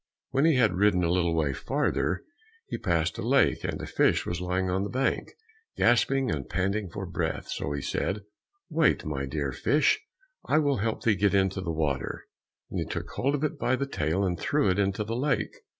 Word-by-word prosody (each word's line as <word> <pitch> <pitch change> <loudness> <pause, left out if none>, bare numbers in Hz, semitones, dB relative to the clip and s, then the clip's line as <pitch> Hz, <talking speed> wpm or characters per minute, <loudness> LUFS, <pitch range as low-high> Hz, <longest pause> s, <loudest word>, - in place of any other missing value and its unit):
When 135 +3 +3
he 165 -3 +5
had 115 -7 +4
ridden 100 -3 +4
a 85 - +2
little 85 -2 +2
way 75 -4 +1
farther, - - -1 0.4
he - - -4
passed 85 -5 0
by - - -4
a - - -4
lake, - - +3
and - - -3
a - - -5
fish - - +2
was 85 0 -3
lying 90 +1 0
on 90 +1 0
the 100 - -3
bank, 130 +2 0 0.5
gasping 130 +1 +3
and 70 -4 -3
panting 95 +2 -1
for - - -5
breath, - - -3
so 70 - -3
he 70 - -4
said, 100 +1 -2 0.4
"Wait, 160 -3 +2
my 70 -3 -3
dear 70 -1 -2
fish, 145 - +2 0.4
I - - +2
will 145 -3 +2
help 110 +2 -2
thee 110 - +4
get 100 0 +2
into 95 -1 +2
the 90 - -4
water," 75 -4 -2 0.5
and - - -2
he - - -1
took - - -5
hold 140 +3 0
of 145 - -3
it 155 -1 -1
by 130 - +2
the 140 - -1
tail, 85 - -1
and 90 -2 -1
threw 145 -10 +2
it 90 - 0
into 100 +1 +1
the 115 +2 -3
lake. 125 -4 0
100 Hz, 215 wpm, -28 LUFS, 85-130 Hz, 0.5 s, he